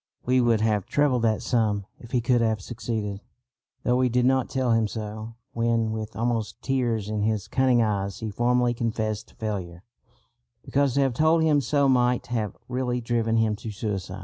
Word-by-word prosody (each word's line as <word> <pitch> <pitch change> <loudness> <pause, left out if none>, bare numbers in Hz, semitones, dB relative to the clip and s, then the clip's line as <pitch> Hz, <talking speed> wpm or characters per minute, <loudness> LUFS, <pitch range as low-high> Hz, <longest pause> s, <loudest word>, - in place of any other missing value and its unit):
We 125 +1 +3
would 115 -2 +3
have 105 -3 +1
trebled 145 -4 +2
that 110 -2 +1
sum 105 -4 +1
if 120 - -12
he 125 0 +1
could 120 0 +2
have 110 -2 +1
succeeded; 105 -1 -4 0.6
though 125 0 +2
we 130 0 +2
did 125 +1 +2
not 130 0 +2
tell 130 -2 0
him 115 -1 +3
so, 110 +1 -6 0.2
when, 115 -1 +1
with 110 -1 -5
almost 115 -2 -1
tears 120 -6 0
in 105 -1 -2
his 110 -2 0
cunning 130 -3 +3
eyes, 100 -2 -1
he 110 -2 -4
formally 120 +2 +2
confessed 110 -2 -3
failure, 95 -5 -5 0.8
because 140 -2 +1
to 140 - +3
have 135 -2 +2
told 160 +5 +3
him 150 -2 +3
so 140 +2 +2
might 125 -2 +2
have 110 -5 -2
really 125 -1 -1
driven 115 -1 0
him 110 -1 +2
to 110 - -7
suicide. 100 -3 -4
115 Hz, 180 wpm, -25 LUFS, 110-125 Hz, 0.8 s, We